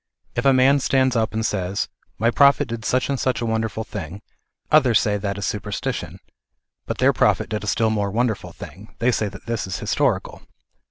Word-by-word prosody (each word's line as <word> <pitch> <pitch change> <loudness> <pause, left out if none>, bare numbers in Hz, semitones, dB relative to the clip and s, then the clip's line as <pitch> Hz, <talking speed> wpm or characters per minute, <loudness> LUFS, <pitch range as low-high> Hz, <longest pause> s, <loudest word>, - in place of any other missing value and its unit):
If - - -2
a 135 - +7
man 135 +2 +5
stands 130 -1 +2
up 110 -2 +1
and 110 0 -2
says 95 -2 -1 0.2
" - - -41
My 115 +3 +2
prophet 140 0 +4
did 115 -1 -6
such 130 0 +1
and 140 -2 -1
such 130 -1 0
a 120 - -2
wonderful 110 -1 -1
thing," 100 -3 -7 0.5
others 130 -7 +5
say 105 -1 0
that 100 -1 -3
is 100 - -3
superstition; 105 0 -4 0.7
but - - -3
their - - +4
prophet - - +2
did 105 -1 -3
a - - -6
still 110 +1 +2
more 105 -2 0
wonderful 110 +1 -1
thing; 100 +4 -12
they 120 +2 +2
say 110 -3 -1
that 100 -1 -13
this 115 -4 -2
is 95 - -3
historical. - - -1
110 Hz, 205 wpm, -22 LUFS, 105-125 Hz, 0.7 s, a